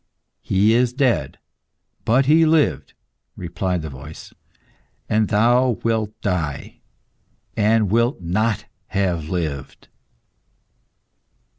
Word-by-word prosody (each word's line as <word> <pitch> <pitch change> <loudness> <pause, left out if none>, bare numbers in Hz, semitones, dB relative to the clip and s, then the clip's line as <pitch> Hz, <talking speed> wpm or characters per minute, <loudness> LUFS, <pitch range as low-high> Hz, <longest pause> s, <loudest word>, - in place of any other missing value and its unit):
"He 100 +4 +2
is 120 +1 +2
dead, 130 -3 0 0.7
but 130 +4 +3
he 155 +4 +5
lived," 160 -1 +1 0.4
replied 90 -1 -3
the 80 - -5
voice; 65 +4 -11 0.7
"and 110 0 +2
thou 120 +3 +3
wilt 110 -1 -1
die, 85 -8 -3 0.8
and 105 -1 +2
wilt 115 +2 +2
not 105 +6 -1 0.2
have 90 -5 -1
lived." 75 -7 -4
105 Hz, 95 wpm, -21 LUFS, 90-120 Hz, 0.8 s, he